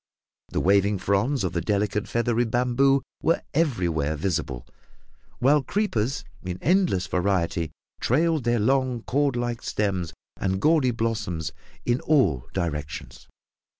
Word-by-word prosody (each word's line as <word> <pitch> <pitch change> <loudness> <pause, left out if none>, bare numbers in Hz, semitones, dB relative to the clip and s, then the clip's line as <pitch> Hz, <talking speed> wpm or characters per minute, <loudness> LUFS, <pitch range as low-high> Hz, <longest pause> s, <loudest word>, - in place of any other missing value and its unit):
The - - -1
waving 100 +2 +3
fronds 100 +7 +1
of 90 - -1
the 85 - 0
delicate 105 +3 0
feathery 120 0 +1
bamboo 125 +4 +2 0.2
were 165 - +1
everywhere 85 - +1
visible, 75 -7 -2 0.7
while 145 +4 +4
creepers 135 - -1 0.2
in 90 -1 -4
endless 175 - +2
variety 90 -3 0 0.3
trailed 160 +3 +2
their 120 0 +2
long 130 +1 +1
cordlike 120 -4 0
stems 95 -6 -1 0.3
and 95 -1 -1
gaudy 150 0 +4
blossoms 110 -8 -2 0.3
in 120 +1 +2
all 85 - +2
directions. 75 -5 -4
110 Hz, 115 wpm, -25 LUFS, 90-130 Hz, 0.7 s, while